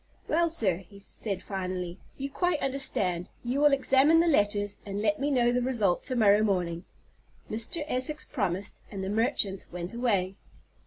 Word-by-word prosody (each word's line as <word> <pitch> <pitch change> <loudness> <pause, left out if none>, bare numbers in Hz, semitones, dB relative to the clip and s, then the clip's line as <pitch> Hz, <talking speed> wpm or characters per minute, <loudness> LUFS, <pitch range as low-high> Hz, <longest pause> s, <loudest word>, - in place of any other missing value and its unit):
"Well, 335 +2 +2
sir." 205 - +2
he 195 +2 -15
said 200 -1 -3
finally, 185 -2 -4 0.2
"you 275 +1 -5
quite 355 0 0
understand. 195 -10 0
You 245 +3 -1
will 295 0 +5
examine 275 +3 +4
the 335 - +4
letters, 205 -8 +1
and 200 0 -5
let 210 -1 +1
me 280 +2 0
know 245 -4 +3
the 250 +1 +1
result 225 -8 +1
to 255 - -2
morrow 210 -3 +5
morning." 180 -5 -1 0.7
Mr. 230 +9 -1
Essex 300 +3 +1
promised, 200 -4 -3
and 195 -2 -6
the 190 - -3
merchant 205 -3 0
went 175 +2 -6
away. 200 -6 0
210 Hz, 165 wpm, -28 LUFS, 190-265 Hz, 0.7 s, will